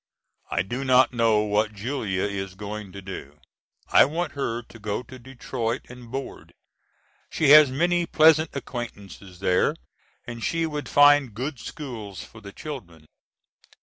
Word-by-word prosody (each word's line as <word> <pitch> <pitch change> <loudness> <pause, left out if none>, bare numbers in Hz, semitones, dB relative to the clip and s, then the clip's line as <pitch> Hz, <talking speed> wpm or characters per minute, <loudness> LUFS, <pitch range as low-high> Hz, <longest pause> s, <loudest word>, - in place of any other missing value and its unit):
I - - 0
do 120 +8 -4
not 130 -1 +4
know 115 -3 +3
what 105 +1 0
Julia 105 -4 -2
is 95 -2 -4
going 105 0 -7
to 100 0 -9
do. 75 -6 -9 0.5
I - - +7
want 160 +3 -3
her 120 -4 -3
to 115 - -15
go 105 +3 -3
to 130 +1 -12
Detroit 120 -1 -4
and 125 -1 -12
board. 135 +2 -7 0.7
She 155 -4 +1
has 150 -1 +9
many 175 +5 +1
pleasant 155 0 +5
acquaintances 100 -8 -8
there 90 -1 +2 0.5
and 120 -1 -7
she 165 0 0
would 150 -3 -5
find 145 -5 +5
good 130 +2 -4
schools 115 - -7
for 110 - -14
the 100 -1 -10
children. 95 - -9
120 Hz, 150 wpm, -25 LUFS, 100-140 Hz, 0.7 s, has